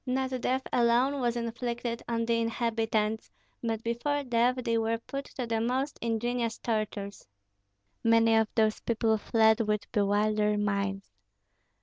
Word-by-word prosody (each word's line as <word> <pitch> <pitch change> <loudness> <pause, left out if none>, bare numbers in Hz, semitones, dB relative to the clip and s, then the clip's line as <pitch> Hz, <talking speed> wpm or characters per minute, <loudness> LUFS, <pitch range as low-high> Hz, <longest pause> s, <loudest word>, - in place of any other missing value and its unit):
Not 260 0 -1
death 260 +1 0
alone 250 +4 +3
was 240 -1 +1
inflicted 235 0 -3
on 230 -1 -1
the 230 0 +1
inhabitants, 225 -2 -1 0.3
but 225 -1 -2
before 285 +5 -1
death 245 0 +2
they 230 - +1
were 225 +1 0
put 275 +4 -6
to 255 - -2
the 225 -1 -1
most 260 +5 -1
ingenious 230 0 -1
tortures. 210 - -3 0.8
Many 230 0 +4
of 220 -1 +3
those 220 -2 +2
people 225 -1 +1
fled 220 0 +3
with 210 -1 -1
bewildered 210 0 +2
minds. 200 -1 -2
230 Hz, 135 wpm, -29 LUFS, 220-240 Hz, 0.8 s, Many